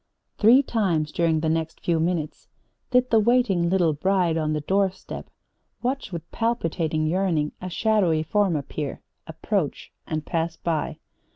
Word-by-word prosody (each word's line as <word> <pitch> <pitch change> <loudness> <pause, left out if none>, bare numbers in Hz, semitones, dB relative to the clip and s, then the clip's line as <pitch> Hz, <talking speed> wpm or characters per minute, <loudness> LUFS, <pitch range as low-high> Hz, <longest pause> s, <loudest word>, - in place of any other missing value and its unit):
Three 240 +6 +6
times 175 - 0
during 165 -2 +1
the 160 - 0
next 160 0 -1
few 170 -2 0
minutes 165 -2 -2 0.4
did 250 0 +2
the 225 - +6
waiting 215 -7 +2
little 175 -4 +3
bride 180 +1 +1
on 155 -1 0
the 150 - -1
doorstep 190 +3 -2 0.5
watch 260 -2 -2
with 170 -2 -7
palpitating 165 -9 -1
yearning 165 -3 +1
a 185 - -4
shadowy 180 -5 +2
form 195 +1 +1
appear, 145 0 -4 0.2
approach 160 0 -2 0.2
and 155 -1 -3
pass 165 -1 -2
by. 160 -3 -2
170 Hz, 145 wpm, -24 LUFS, 160-200 Hz, 0.5 s, Three